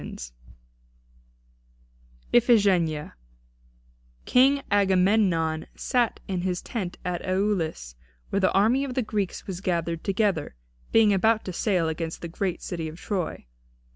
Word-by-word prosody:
III -, -, -8 dB, 2.2 s
IPHIGENIA 195 Hz, -10 st, +3 dB, 1.1 s
King 270 Hz, +2 st, +4 dB
Agamemnon 185 Hz, -5 st, +2 dB
sat 245 Hz, -3 st, 0 dB
in 185 Hz, -2 st, -2 dB
his 180 Hz, -1 st, -2 dB
tent 190 Hz, -7 st, -4 dB
at 180 Hz, -1 st, -2 dB
Aulis, 185 Hz, -, -1 dB, 0.4 s
where 200 Hz, -, +1 dB
the 190 Hz, -, +3 dB
army 225 Hz, +8 st, +3 dB
of 260 Hz, -3 st, -4 dB
the 255 Hz, -, +1 dB
Greeks 210 Hz, -3 st, -3 dB
was 185 Hz, -2 st, -6 dB
gathered 170 Hz, -3 st, -1 dB
together, 195 Hz, -, 0 dB, 0.4 s
being 220 Hz, -2 st, +5 dB
about 220 Hz, +3 st, +2 dB
to 185 Hz, -, -5 dB
sail 180 Hz, -3 st, +1 dB
against 160 Hz, 0 st, -4 dB
the -, -, -3 dB
great 180 Hz, +2 st, -3 dB
city 170 Hz, -3 st, -4 dB
of 160 Hz, +2 st, -9 dB
Troy. 185 Hz, -, -3 dB
190 Hz, 125 wpm, -26 LUFS, 170-215 Hz, 2.2 s, being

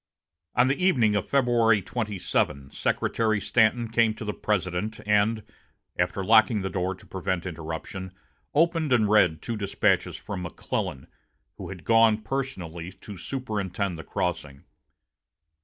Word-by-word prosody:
On 125 Hz, +1 st, +5 dB
the 140 Hz, +7 st, 0 dB
evening 125 Hz, -, +4 dB
of 100 Hz, -, -1 dB
February 120 Hz, -6 st, +3 dB
27, 95 Hz, -, -2 dB
Secretary 110 Hz, -2 st, 0 dB
Stanton 115 Hz, +2 st, +2 dB
came 115 Hz, -1 st, +2 dB
to 110 Hz, -, -7 dB
the 105 Hz, -, -2 dB
President, 105 Hz, +1 st, -2 dB
and, 105 Hz, +1 st, +2 dB, 0.5 s
after 90 Hz, +2 st, -1 dB
locking 110 Hz, -1 st, +5 dB
the 95 Hz, -, -3 dB
door 95 Hz, +1 st, -1 dB
to 95 Hz, -, -18 dB
prevent 95 Hz, -1 st, -3 dB
interruption, 85 Hz, +2 st, -6 dB, 0.4 s
opened 165 Hz, -1 st, +2 dB
and 110 Hz, -3 st, +4 dB
read 90 Hz, -7 st, +3 dB
two 115 Hz, -, -3 dB
despatches 100 Hz, -2 st, +1 dB
from 100 Hz, -3 st, -6 dB
McClellan, 75 Hz, -5 st, -4 dB, 0.5 s
who -, -, -7 dB
had 90 Hz, -4 st, -8 dB
gone 115 Hz, -1 st, +4 dB
personally 95 Hz, -10 st, -4 dB
to 100 Hz, +1 st, -10 dB
superintend 100 Hz, -5 st, -3 dB
the 80 Hz, -, -8 dB
crossing. 75 Hz, -6 st, -3 dB
105 Hz, 135 wpm, -26 LUFS, 90-115 Hz, 0.5 s, On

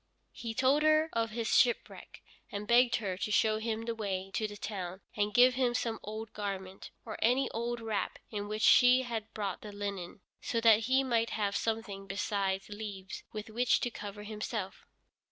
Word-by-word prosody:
He 230 Hz, -1 st, -6 dB
told 265 Hz, +4 st, +3 dB
her 310 Hz, +1 st, +4 dB
of 230 Hz, 0 st, 0 dB
his 225 Hz, 0 st, -3 dB
shipwreck, 240 Hz, -2 st, +1 dB, 0.3 s
and 205 Hz, +1 st, -5 dB
begged 240 Hz, +1 st, +5 dB
her 195 Hz, -5 st, -2 dB
to 205 Hz, -, -2 dB
show 215 Hz, 0 st, +3 dB
him 225 Hz, 0 st, -2 dB
the 230 Hz, 0 st, -2 dB
way 195 Hz, -3 st, -3 dB
to 215 Hz, -, 0 dB
the 205 Hz, 0 st, -9 dB
town, 190 Hz, -3 st, -5 dB
and 205 Hz, 0 st, +1 dB
give 250 Hz, +3 st, +6 dB
him 245 Hz, -1 st, +1 dB
some 230 Hz, -2 st, -1 dB
old 215 Hz, +1 st, -7 dB
garment, 195 Hz, -2 st, -5 dB, 0.2 s
or 220 Hz, -2 st, -6 dB
any 250 Hz, +4 st, +3 dB
old 235 Hz, +1 st, -2 dB
wrap 220 Hz, -2 st, -2 dB
in 205 Hz, -2 st, -3 dB
which 215 Hz, +1 st, -3 dB
she 250 Hz, +1 st, +7 dB
had 225 Hz, -3 st, -4 dB
brought 200 Hz, -4 st, -3 dB
the 210 Hz, -, -8 dB
linen, 200 Hz, -2 st, -5 dB, 0.2 s
so 230 Hz, -, -1 dB
that 225 Hz, -1 st, +5 dB
he 265 Hz, +1 st, +4 dB
might 230 Hz, -3 st, +1 dB
have 205 Hz, -2 st, -1 dB
something 220 Hz, -3 st, -2 dB
besides 195 Hz, -1 st, -1 dB
leaves 205 Hz, -2 st, -7 dB
with 215 Hz, 0 st, -7 dB
which 245 Hz, +3 st, +3 dB
to 245 Hz, -, -1 dB
cover 205 Hz, -1 st, -7 dB
himself. 210 Hz, -2 st, -5 dB
215 Hz, 185 wpm, -32 LUFS, 205-235 Hz, 0.3 s, she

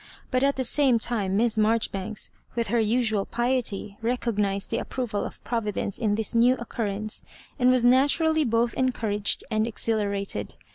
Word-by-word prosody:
But 255 Hz, -, +1 dB
at 280 Hz, +1 st, +2 dB
the 260 Hz, -, -1 dB
same 260 Hz, -1 st, +4 dB
time 205 Hz, -4 st, 0 dB
Miss 225 Hz, 0 st, +2 dB
Marjoribanks, 215 Hz, -2 st, 0 dB, 0.2 s
with 230 Hz, -3 st, -1 dB
her 235 Hz, +2 st, +2 dB
usual 220 Hz, -2 st, +1 dB
piety, 240 Hz, -5 st, -2 dB
re 240 Hz, +2 st, 0 dB
oc^ised 205 Hz, -4 st, -1 dB
the -, -, -1 dB
approval 240 Hz, -6 st, -3 dB
of -, -, -8 dB
Providence 210 Hz, -4 st, -3 dB
in 215 Hz, -4 st, +1 dB
this 220 Hz, +1 st, -1 dB
new 240 Hz, +2 st, +4 dB
occurrence, 215 Hz, -3 st, -4 dB, 0.4 s
and 250 Hz, 0 st, +4 dB
was 255 Hz, -1 st, +4 dB
naturally 295 Hz, +5 st, +4 dB
both 235 Hz, -1 st, +1 dB
encouraged 220 Hz, -5 st, 0 dB
and 215 Hz, +1 st, +1 dB
exhilarated. 205 Hz, -3 st, -1 dB
230 Hz, 155 wpm, -25 LUFS, 210-245 Hz, 0.4 s, same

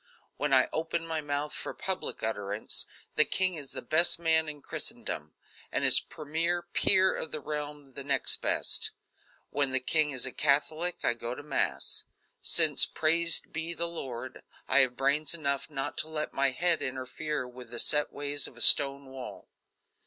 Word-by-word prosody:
When 145 Hz, 0 st, -2 dB
I 130 Hz, -1 st, +5 dB
open 165 Hz, +1 st, -2 dB
my 160 Hz, -1 st, -3 dB
mouth 145 Hz, 0 st, -4 dB
for -, -, -6 dB
public 190 Hz, -1 st, -4 dB
utterance, 105 Hz, -1 st, -3 dB, 0.3 s
the -, -, +6 dB
king 185 Hz, +3 st, 0 dB
is 145 Hz, -5 st, -8 dB
the -, -, -7 dB
best 170 Hz, +3 st, +4 dB
man 160 Hz, -2 st, +2 dB
in 150 Hz, -1 st, -7 dB
Christendom, 75 Hz, 0 st, -5 dB, 0.4 s
and -, -, -1 dB
his -, -, +8 dB
premier 165 Hz, +3 st, -3 dB
peer 190 Hz, +2 st, +2 dB
of 160 Hz, -, -6 dB
the 155 Hz, -, -4 dB
realm 145 Hz, -1 st, -6 dB
the 140 Hz, -, -8 dB
next 135 Hz, -2 st, +1 dB
best. -, -, -1 dB, 0.6 s
When 140 Hz, -2 st, +2 dB
the 130 Hz, 0 st, 0 dB
king 155 Hz, +4 st, 0 dB
is 130 Hz, -3 st, -2 dB
a 130 Hz, -, -3 dB
Catholic 155 Hz, +5 st, 0 dB
I -, -, +2 dB
go 120 Hz, +1 st, -6 dB
to 145 Hz, -, -10 dB
Mass; 145 Hz, -2 st, -2 dB, 0.4 s
since, -, -, +5 dB
praised 165 Hz, +1 st, +2 dB
be 165 Hz, +1 st, -4 dB
the 170 Hz, +1 st, 0 dB
Lord, 130 Hz, -7 st, -7 dB, 0.3 s
I 140 Hz, -, +4 dB
have 130 Hz, -2 st, +2 dB
brains 145 Hz, +4 st, +1 dB
enough 140 Hz, -2 st, -2 dB
not 145 Hz, -1 st, -4 dB
to -, -, -2 dB
let 155 Hz, -1 st, -5 dB
my 140 Hz, 0 st, +1 dB
head 170 Hz, +5 st, 0 dB
interfere 130 Hz, +2 st, -4 dB
with 125 Hz, -1 st, -12 dB
the 120 Hz, -, -6 dB
set 150 Hz, 0 st, +2 dB
ways 145 Hz, 0 st, +1 dB
of -, -, -14 dB
a -, -, -11 dB
stone 140 Hz, -1 st, +8 dB
wall. 130 Hz, -1 st, -10 dB
145 Hz, 175 wpm, -28 LUFS, 135-160 Hz, 0.6 s, his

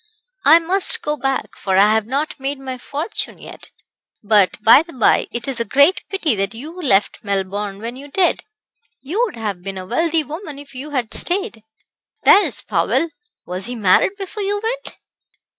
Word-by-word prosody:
"I 325 Hz, -, +8 dB
must 385 Hz, +7 st, +1 dB
go 300 Hz, -, -1 dB
back, 270 Hz, -1 st, -3 dB
for 190 Hz, -1 st, -1 dB
I 205 Hz, +2 st, +6 dB
have 220 Hz, -1 st, 0 dB
not 285 Hz, +4 st, -2 dB
made 275 Hz, +1 st, -3 dB
my 260 Hz, -1 st, -6 dB
fortune 295 Hz, -, -4 dB
yet. -, -, -12 dB, 0.5 s
But, 205 Hz, -2 st, +3 dB
by 230 Hz, +6 st, +8 dB
the 335 Hz, +1 st, -12 dB
by, 250 Hz, -4 st, +3 dB
it 240 Hz, +1 st, -2 dB
is 265 Hz, -3 st, -3 dB
a -, -, +1 dB
great 285 Hz, -, +3 dB
pity 345 Hz, -8 st, 0 dB
that 195 Hz, +2 st, -2 dB
you 285 Hz, +8 st, -8 dB
left 210 Hz, -, +1 dB
Melbourne 200 Hz, 0 st, -3 dB
when 230 Hz, +3 st, -6 dB
you 275 Hz, +2 st, -10 dB
did. 360 Hz, +5 st, +1 dB, 0.6 s
You 345 Hz, -, -2 dB
would 465 Hz, -, -7 dB
have 210 Hz, -5 st, -4 dB
been 195 Hz, +1 st, -6 dB
a 185 Hz, -, -6 dB
wealthy 325 Hz, -, +1 dB
woman 305 Hz, 0 st, -8 dB
if 280 Hz, -1 st, -12 dB
you 265 Hz, +4 st, -7 dB
had 255 Hz, -6 st, -3 dB
stayed. 385 Hz, -, -2 dB, 0.6 s
There's 410 Hz, -, +5 dB
Powell 335 Hz, -, 0 dB, 0.4 s
was 185 Hz, +2 st, -5 dB
he 245 Hz, -, -5 dB
married 215 Hz, -, +3 dB
before 405 Hz, +2 st, -6 dB
you 405 Hz, +1 st, -1 dB
went?" -, -, -4 dB
270 Hz, 180 wpm, -19 LUFS, 215-330 Hz, 0.6 s, I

